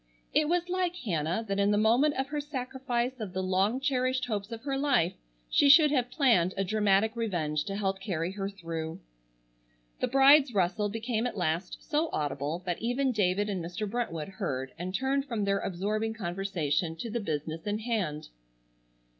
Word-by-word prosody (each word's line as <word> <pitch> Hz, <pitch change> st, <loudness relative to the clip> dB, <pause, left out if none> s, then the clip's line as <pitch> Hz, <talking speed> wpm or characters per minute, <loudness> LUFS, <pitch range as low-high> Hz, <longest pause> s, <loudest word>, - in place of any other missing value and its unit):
It 305 Hz, 0 st, +3 dB
was 350 Hz, 0 st, +1 dB
like 360 Hz, -1 st, -1 dB
Hannah 180 Hz, -, -2 dB
that 200 Hz, 0 st, -1 dB
in 200 Hz, 0 st, +3 dB
the 205 Hz, -, +3 dB
moment 240 Hz, +8 st, +3 dB
of 265 Hz, +1 st, -2 dB
her 295 Hz, 0 st, -2 dB
sacrifice 255 Hz, -2 st, -3 dB
of 205 Hz, -5 st, -5 dB
the 190 Hz, 0 st, -2 dB
long 190 Hz, +6 st, +1 dB
cherished 260 Hz, -2 st, 0 dB
hopes 210 Hz, -2 st, -3 dB
of 225 Hz, -1 st, -7 dB
her 275 Hz, -1 st, -1 dB
life 270 Hz, -, +2 dB, 0.3 s
she 285 Hz, -, +4 dB
should 300 Hz, +1 st, +8 dB
have 250 Hz, -4 st, +1 dB
planned 215 Hz, -, +3 dB
a 195 Hz, -, +1 dB
dramatic 210 Hz, +2 st, +2 dB
revenge 160 Hz, -10 st, -1 dB
to 195 Hz, -, -4 dB
help 195 Hz, -1 st, -1 dB
carry 175 Hz, -3 st, -2 dB
her 195 Hz, 0 st, -3 dB
through. 165 Hz, -4 st, -5 dB, 1.0 s
The -, -, +1 dB
bride's 270 Hz, -1 st, +6 dB
rustle 200 Hz, +3 st, +1 dB
became 225 Hz, +2 st, -1 dB
at 245 Hz, -, -6 dB
last 175 Hz, +1 st, -2 dB
so 315 Hz, +1 st, +1 dB
audible 150 Hz, +3 st, -2 dB
that 175 Hz, -2 st, -2 dB
even 250 Hz, +4 st, +1 dB
David 205 Hz, -2 st, +1 dB
and 190 Hz, -4 st, -2 dB
Mr. 180 Hz, +5 st, -4 dB
Brentwood 195 Hz, -8 st, -3 dB
heard 135 Hz, -10 st, -4 dB
and 185 Hz, +2 st, -4 dB
turned 270 Hz, +4 st, 0 dB
from 230 Hz, -6 st, -2 dB
their 200 Hz, 0 st, +1 dB
absorbing 215 Hz, +5 st, -2 dB
conversation 175 Hz, -5 st, -1 dB
to 225 Hz, +7 st, -6 dB
the 235 Hz, -, -1 dB
business 160 Hz, -2 st, -4 dB
in 205 Hz, +1 st, 0 dB
hand. 210 Hz, -10 st, -2 dB
210 Hz, 180 wpm, -29 LUFS, 180-255 Hz, 1.0 s, should